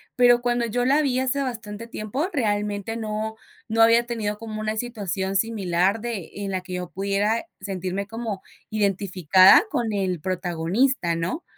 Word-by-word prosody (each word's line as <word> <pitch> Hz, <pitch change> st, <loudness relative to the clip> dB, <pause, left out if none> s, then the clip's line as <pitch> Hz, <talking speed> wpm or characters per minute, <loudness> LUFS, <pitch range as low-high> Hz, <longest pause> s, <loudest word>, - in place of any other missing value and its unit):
pero 245 Hz, -1 st, +5 dB
cuando 240 Hz, -1 st, +1 dB
yo 245 Hz, +2 st, -1 dB
la 280 Hz, +4 st, +4 dB
vi 260 Hz, -4 st, +1 dB
hace 260 Hz, +2 st, 0 dB
bastante 230 Hz, -4 st, -5 dB
tiempo, 230 Hz, -, -3 dB
realmente 210 Hz, -, -1 dB
no 220 Hz, 0 st, -3 dB, 0.3 s
no 225 Hz, 0 st, +1 dB
había 230 Hz, +1 st, +6 dB
tenido 215 Hz, -3 st, -3 dB
como 215 Hz, -1 st, -6 dB
una 215 Hz, 0 st, -1 dB
situación 200 Hz, -5 st, -3 dB
similar 195 Hz, -1 st, +1 dB
de, 220 Hz, -8 st, -4 dB
en 200 Hz, -1 st, -4 dB
la 190 Hz, -, -1 dB
que 185 Hz, 0 st, -9 dB
yo 180 Hz, -1 st, -4 dB
pudiera 200 Hz, -, 0 dB, 0.2 s
sentirme 190 Hz, 0 st, -3 dB
como 225 Hz, -2 st, -5 dB, 0.3 s
identificada 195 Hz, -, +5 dB
con 235 Hz, -3 st, 0 dB
el 190 Hz, -4 st, -1 dB
protagonista, 180 Hz, -, 0 dB
¿no? 175 Hz, -, -3 dB
210 Hz, 155 wpm, -24 LUFS, 190-235 Hz, 0.3 s, había